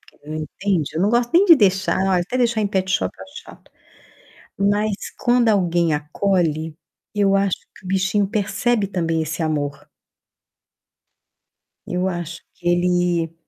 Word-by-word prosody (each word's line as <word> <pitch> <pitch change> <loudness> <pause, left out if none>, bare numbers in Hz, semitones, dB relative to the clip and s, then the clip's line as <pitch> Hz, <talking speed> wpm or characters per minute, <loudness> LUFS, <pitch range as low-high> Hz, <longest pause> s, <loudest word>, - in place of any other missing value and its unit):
porque - - -24
ele 155 +1 -6
não 155 - -3
entende. 180 -3 -2
Eu 165 - 0
não 205 - +2
gosto 240 0 +1
nem 370 - +6
de 335 -5 +8
deixar, 190 -3 +2 0.2
até 180 +8 -1
deixar 235 -3 +1
em 210 - +1
petshop 190 -1 0
eu - - -9
acho 285 +2 -11
chato. - - -17 0.9
Mas, 205 +1 +1 0.3
quando 240 -1 +3
alguém 175 -5 +2
acolhe, 160 0 -1 0.4
eu 200 -1 +2
acho 195 -2 +1 0.2
que - - -19
o 185 - -10
bichinho 195 +2 +1
percebe 210 +1 0
também 165 -4 -1
esse 160 +2 -3
amor. 145 -2 -2 2.0
Eu 180 +1 -1
acho 175 -2 -5
que 175 - -4
ele 175 -2 +1
190 Hz, 150 wpm, -21 LUFS, 165-205 Hz, 2.0 s, de